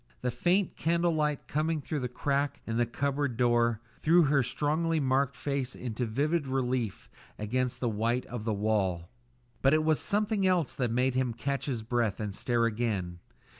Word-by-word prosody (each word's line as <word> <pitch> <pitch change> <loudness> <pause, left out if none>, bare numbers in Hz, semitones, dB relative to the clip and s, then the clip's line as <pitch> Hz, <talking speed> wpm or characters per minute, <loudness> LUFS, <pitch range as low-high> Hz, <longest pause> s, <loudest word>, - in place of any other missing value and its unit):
The 125 - 0
faint 180 - +1
candle 170 +1 +1
light 150 -2 -1
coming 155 +1 0
through 150 +1 -3
the 125 - -2
crack 140 +3 -1
in 115 0 -2
the 120 0 +2
cupboard 140 0 -1
door, 120 -2 +2 0.2
threw 170 +2 +5
her 140 -1 +3
strongly 155 +6 0
marked 135 -1 +1
face 140 -2 -2
into 120 0 -3
vivid 145 +6 0
relief 130 -5 -1 0.3
against 125 +4 -1
the 125 - 0
white 115 +3 0
of 120 -3 -6
the 110 - -1
wall. 95 -5 0 0.5
But 135 +3 +5
it 155 - +2
was 155 -1 +2
something 205 -1 +1
else 180 -6 +2
that 125 -3 -1
made 125 +3 +1
him 130 -2 0
catch 140 +4 -2
his 120 -5 -2
breath 115 -3 0
and 105 -2 -3
stare 120 +3 +1
again. 105 -7 -2
130 Hz, 175 wpm, -29 LUFS, 115-150 Hz, 0.5 s, threw